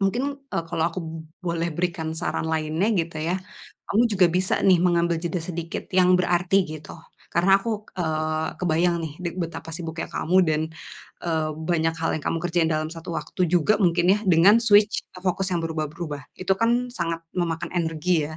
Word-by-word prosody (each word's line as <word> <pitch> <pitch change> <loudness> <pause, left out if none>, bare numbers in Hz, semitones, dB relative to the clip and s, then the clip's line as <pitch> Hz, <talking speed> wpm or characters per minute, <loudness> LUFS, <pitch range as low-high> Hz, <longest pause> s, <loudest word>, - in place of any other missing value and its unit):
mungkin, 225 +7 +1 0.3
eee, 165 - -1
kalau 165 -1 0
aku 185 - -6
b - - -6 0.4
boleh 170 0 0
berikan 170 -2 -1
saran 160 -1 -2
lainnya 160 +5 0
gitu, 165 -1 -2
ya. 180 - +1 0.5
Kamu 220 +4 +3
juga 190 -3 +5
bisa, 185 0 +1
nih, 185 -2 +6
mengambil 170 -1 +2
jeda 170 +1 -1
sedikit 165 0 -5
yang 180 -1 +5
berarti, 180 +2 +2
gitu. 155 +1 -9 0.3
Karena 190 +3 +5
aku, 215 -2 -3
eee, 155 -2 -1
kebayang, 175 0 +2
nih, 145 - -8
dig 170 -1 -3
betapa 165 -1 -5
sibuknya 165 -1 -4
kamu, 180 +4 0
dan, 155 0 +2 0.6
eee, 160 -2 0 0.2
banyak 165 -1 +1
hal 165 - +1
yang - - -12
kamu 165 - 0
kerjain 170 -2 +2
dalam 155 0 -1
satu 165 -1 -10
waktu 150 +4 -4
juga 175 +4 +3
mungkin, 175 -1 +3
ya, 210 - +2
dengan 190 +7 +6
switch 210 -2 +4 0.2
fokus 190 +1 0
yang 170 - +1
berubah-berubah. 155 -2 -4
Itu, 190 +1 0
kan, 240 +2 +2
sangat 165 -4 -3
memakan 165 -2 -1
energi, 165 -1 +1
ya. 155 - -8
170 Hz, 175 wpm, -24 LUFS, 160-185 Hz, 0.6 s, nih